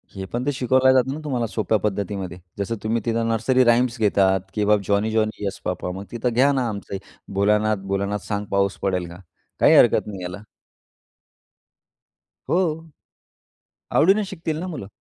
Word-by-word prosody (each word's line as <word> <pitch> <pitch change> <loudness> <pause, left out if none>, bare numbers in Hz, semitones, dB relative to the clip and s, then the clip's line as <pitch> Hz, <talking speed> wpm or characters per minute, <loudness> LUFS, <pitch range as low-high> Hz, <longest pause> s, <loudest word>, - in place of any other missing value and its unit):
हे 95 -1 -5
पण 120 +2 -2
ते 145 - +1
शिकवलं 130 0 +3
जातं 130 +1 +2
ना, 150 - -6
तुम्हाला 125 -6 -1
सोप्या 110 0 0
पद्धतीमध्ये. 100 -3 -3 0.2
जसं 100 +3 -2
तुम्ही 115 +2 0
तिथं 115 -1 0
नर्सरी 120 +3 +2
राइम्स 120 +1 +3
घेतात 95 -3 +3
किंवा 105 0 +3
जॉनी, 105 +2 +1
जॉनी 110 -1 -1
येस 100 -1 -3
पापा! 90 0 -3
मग 100 - -8
तिथं 120 +1 -1
घ्या 135 +4 +4
ना 130 -3 0
आमचं 100 -2 -5 0.4
भोलानाथ, 105 +2 +2
भोलानाथ 100 +1 -1
सांग 105 -1 -2
पाऊस 100 0 +1
पडेल 90 -2 -1
का? 85 - -11 0.4
काही - - +6
हरकत - - +5
नाही 100 -3 -7
याला. 90 +3 -6 2.1
हो. 165 -2 0 1.1
आवडीने 195 +5 +4
शिकतील 165 -5 -4
ना 185 - -4
मुलं, 150 - -6
110 Hz, 160 wpm, -23 LUFS, 100-130 Hz, 2.1 s, काही